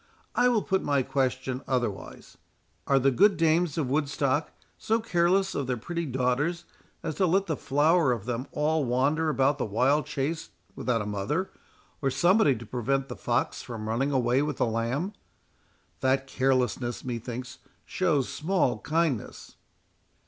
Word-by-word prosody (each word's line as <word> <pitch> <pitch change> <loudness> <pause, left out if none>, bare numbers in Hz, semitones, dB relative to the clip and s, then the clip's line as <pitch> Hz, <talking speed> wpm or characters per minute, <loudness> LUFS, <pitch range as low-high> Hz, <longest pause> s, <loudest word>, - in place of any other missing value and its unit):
—I 245 - +3
will 230 -4 +2
put 190 -1 0
my 140 -2 +1
question 130 -1 -1
otherwise.—Are 125 +3 -4
the 135 +1 +3
good 200 +9 +4
dames 165 -1 +2
of 150 -5 0
Woodstock 145 0 0 0.2
so 225 +1 0
careless 190 -2 +2
of 140 - -2
their 125 -1 -1
pretty 170 +7 -4
daughters 135 +7 0 0.4
as 160 - -2
to 185 - +5
let 190 +3 +2
the 160 - -1
flower 150 +1 +2
of 115 -5 -2
them 125 +2 -3
all 150 +1 +1
wander 140 +6 +1
about 140 0 +2
the - - 0
wild 130 +8 +2
chase 150 +4 -3 0.3
without 115 -4 -1
a - - -7
mother, 105 - -2 0.5
or 135 - +1
a - - -4
somebody 175 - +4
to 115 +1 -9
prevent 135 +4 -1
the 125 - -5
fox 120 -1 -1
from 110 -3 -6
running 125 +6 0
away 130 0 +2
with 150 -2 -2
the - - +2
lamb?—that 130 - -4
carelessness, 130 -3 0
methinks, 120 +1 -5 0.3
shows 155 -8 +1
small 155 - 0
kindness." 155 -4 -2
135 Hz, 150 wpm, -27 LUFS, 125-160 Hz, 0.5 s, to